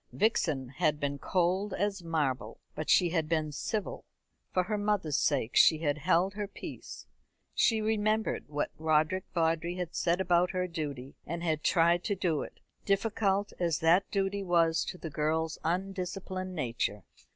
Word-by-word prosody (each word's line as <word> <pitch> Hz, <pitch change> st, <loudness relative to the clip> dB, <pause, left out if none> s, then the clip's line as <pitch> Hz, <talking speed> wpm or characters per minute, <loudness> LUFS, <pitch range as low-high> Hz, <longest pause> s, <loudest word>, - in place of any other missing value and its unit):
Vixen 160 Hz, -, +1 dB
had 150 Hz, +2 st, 0 dB
been 140 Hz, -1 st, -2 dB
cold 185 Hz, +4 st, 0 dB
as 200 Hz, -1 st, -1 dB
marble, 135 Hz, -9 st, -2 dB
but 155 Hz, -, -5 dB
she 175 Hz, -, +5 dB
had 160 Hz, -3 st, -1 dB
been 155 Hz, -2 st, 0 dB
civil. 210 Hz, +8 st, -3 dB, 0.5 s
For 185 Hz, -, +2 dB
her 210 Hz, +3 st, -2 dB
mother's 205 Hz, -8 st, +1 dB
sake 130 Hz, -5 st, 0 dB
she 160 Hz, -, +7 dB
had 155 Hz, -1 st, -1 dB
held 180 Hz, +4 st, +2 dB
her 205 Hz, 0 st, -4 dB
peace. 200 Hz, -, -9 dB, 0.5 s
She 225 Hz, -2 st, +3 dB
remembered 215 Hz, 0 st, 0 dB
what 145 Hz, 0 st, -2 dB
Roderick 155 Hz, +4 st, +2 dB
Vawdrey 165 Hz, +1 st, +1 dB
had 180 Hz, -2 st, -4 dB
said 170 Hz, +1 st, +1 dB
about 180 Hz, -1 st, +3 dB
her 185 Hz, 0 st, 0 dB
duty, 145 Hz, -6 st, -5 dB
and 170 Hz, +2 st, -4 dB
had 155 Hz, -3 st, 0 dB
tried 170 Hz, 0 st, +3 dB
to 205 Hz, -, 0 dB
do 170 Hz, -5 st, 0 dB
it, -, -, -9 dB, 0.2 s
difficult 200 Hz, 0 st, +1 dB
as 170 Hz, -3 st, +1 dB
that 170 Hz, +4 st, +4 dB
duty 200 Hz, 0 st, -1 dB
was 170 Hz, -3 st, +2 dB
to 180 Hz, -, -6 dB
the 160 Hz, -3 st, -7 dB
girl's 155 Hz, +2 st, -1 dB
undisciplined 185 Hz, +1 st, -3 dB
nature. 115 Hz, -, -2 dB
170 Hz, 160 wpm, -30 LUFS, 155-195 Hz, 0.5 s, she